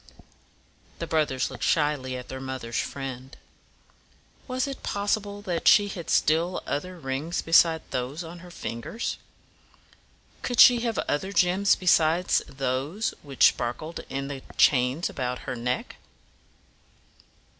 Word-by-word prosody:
The 170 - -4
brothers 150 -5 0
looked - - -7
shyly 145 -4 +1
at 125 - -9
their 130 0 -7
mother's 130 -3 -4
friend. 135 -1 -6 1.1
Was 255 -1 -1
it 275 -1 -6
possible 205 0 -2
that 175 -4 -2
she 205 -1 +6
had 175 -4 -7
still 165 +4 +2
other 180 +5 -4
rings 145 +3 -3
besides 165 0 +4
those 130 +7 -3
on 170 +1 -9
her 180 +1 -12
fingers? 170 - -5 1.2
Could 245 - -3
she 245 -2 +9
have 230 -1 -2
other 190 +7 -1
gems 195 +1 +3
besides 175 -1 +3
those 135 - -2
which 140 -4 +4
sparkled 155 +8 -4
in 135 0 -3
the 140 -2 -6 0.2
chains 130 +4 +3
about 125 -1 -4
her 130 - -3
neck? 125 +1 -3
155 Hz, 125 wpm, -26 LUFS, 130-180 Hz, 1.2 s, she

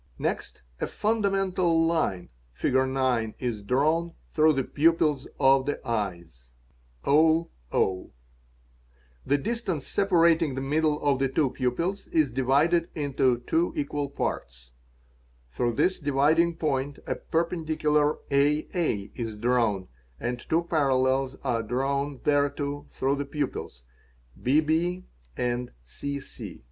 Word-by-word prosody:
Next - - -3 0.2
a - - -1
fundamental 195 -6 +1
line 155 - 0 0.2
(Fig. 60 - -1
9) 130 -4 +1
is 120 -5 -3
drawn 155 +9 +1 0.2
through 155 0 +5
the 135 -2 0
pupils 150 -1 +2
of 135 0 +4
the 145 - -1
eyes; 85 - -4 0.5
the 145 - +1 1.3
distance 190 - -2
separating 170 -6 +3
the - - -2
middle 150 +2 +1
of 140 -2 +2
the 135 -1 +1
two 135 0 +1
pupils 140 +10 -2
is 155 -6 +2
divided 145 +7 +2
into 135 -5 +1
two 165 +7 0
equal 145 -1 -2
parts; - - -4 0.8
through 120 - 0
this 185 +10 +1
dividing 155 +3 +2
point 145 -3 -1
a - - -1
perpendicular 155 -3 0
aa - - -25 0.9
is 115 -3 -5
drawn, 115 -4 +1
_ - - -23 0.3
and 120 +1 -3
two 160 +7 0
parallels 135 -4 +1
are 120 -4 0
drawn 135 +4 -1
thereto 145 0 0
through 135 +2 -1
the 140 - -2
pupils 140 - -4 0.6
(bbécc). 160 +6 +1
140 Hz, 110 wpm, -27 LUFS, 125-160 Hz, 1.3 s, through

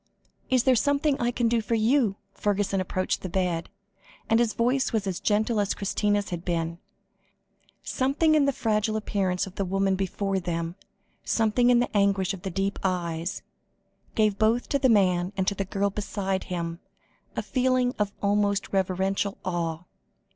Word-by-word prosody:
"Is 255 -2 +3
there 260 - +5
something 285 +4 +2
I 240 - +2
can 245 -1 0
do 230 0 +2
for 230 +2 -1
you?" 225 -1 +2 0.2
Fergusson 200 -1 0
approached 185 0 -1
the 185 - -5
bed, 175 -2 -1 0.6
and 225 - +5
his 235 -2 +1
voice 255 +3 +1
was 220 -4 0
as 190 -1 -2
gentle 215 +2 +1
as 205 -1 0
Christina's 205 0 0
had 175 -1 -4
been. 170 -1 -2 1.0
Something 280 +5 +1
in 300 -2 +4
the 280 - +3
fragile 215 -3 0
appearance 190 -4 -1
of 190 - -10
the 195 - 0
woman 195 +1 +1
before 195 +1 -1
them, 170 -2 -3 0.5
something 225 +2 +2
in 245 - +6
the 245 -2 0
anguish 200 -1 +2
of 190 - -8
the 190 - -4
deep 195 +3 -2
eyes, 175 -1 -2 0.7
gave 215 -2 +2
both 225 +3 +2
to 280 - +1
the 260 -1 +3
man 185 -3 +3
and 190 -1 0
to - - +3
the 195 0 -3
girl 200 +2 -1
beside 195 -2 -2
him, 170 -1 -4 0.6
a - - -2
feeling 255 -1 +1
of 205 -1 +1
almost 200 0 +1
reverential 195 +1 0
awe. 170 -2 -2
200 Hz, 170 wpm, -26 LUFS, 185-230 Hz, 1.0 s, in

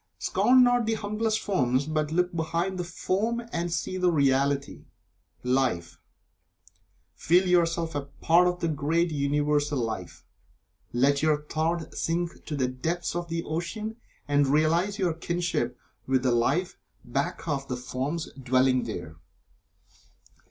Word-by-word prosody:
Scorn 255 +1 +4
not 245 -2 +3
the 225 - +1
humblest 215 +1 -1
forms, 135 - +1
but 155 0 -1
look 180 +1 +1
behind 170 +3 -1
the - - 0
form 195 +6 -1
and 170 0 -1
see 170 +2 -2
the 180 -1 +3
reality 140 -1 +1 0.6
Life. 125 -10 0 1.1
Feel 180 +4 +3
yourself 170 -2 +2
a 145 -1 -3
part 170 +5 +3
of 180 0 -2
the 170 - +1
great 160 +3 +1
Universal 145 0 +1
Life. 110 -7 -4 0.7
Let 140 +4 +2
your 150 -1 +2
thought 160 +2 -2
sink 170 +1 -2
to 150 - -4
the 130 -3 +1
depths 160 +8 -3
of 175 0 -2
the 165 0 -2
ocean, 210 +8 -4 0.3
and 145 -1 +3
realize 165 +8 +2
your 180 -5 +1
kinship 170 +1 -2 0.3
with 130 -1 +2
the 130 - +3
Life 135 +10 +1 0.3
back 135 +6 -2
of 140 -3 -2
the 125 - -3
forms 135 +6 -3
dwelling 130 -1 +2
there. 85 -7 -6
155 Hz, 140 wpm, -27 LUFS, 135-175 Hz, 1.1 s, Scorn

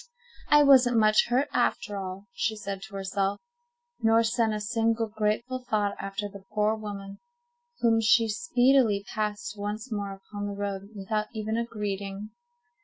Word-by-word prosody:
"I 295 0 +7
wasn't 255 -4 +6
much 215 -1 +4
hurt 255 +4 +2
after 205 - 0
all," 190 0 -6
she 220 +2 -1
said 200 -2 -5
to 210 - -12
herself, 195 +1 -1 0.6
nor 225 +1 +4
sent 225 0 +1
a 215 - -2
single 225 +2 0
grateful 220 +4 -2
thought 205 -2 +1
after 195 +1 -4
the 200 -1 -12
poor 210 +1 +3
woman, 200 -2 -7 0.6
whom 225 -1 +4
she 225 +1 +4
speedily 245 -4 +3
passed 215 +6 -3
once 210 +4 -4
more 200 -2 -3
upon 205 +1 -7
the 200 - -5
road 200 -1 -4
without 210 +2 -2
even 220 0 -2
a 235 0 -1
greeting. 205 -1 -4
215 Hz, 155 wpm, -27 LUFS, 200-225 Hz, 0.6 s, I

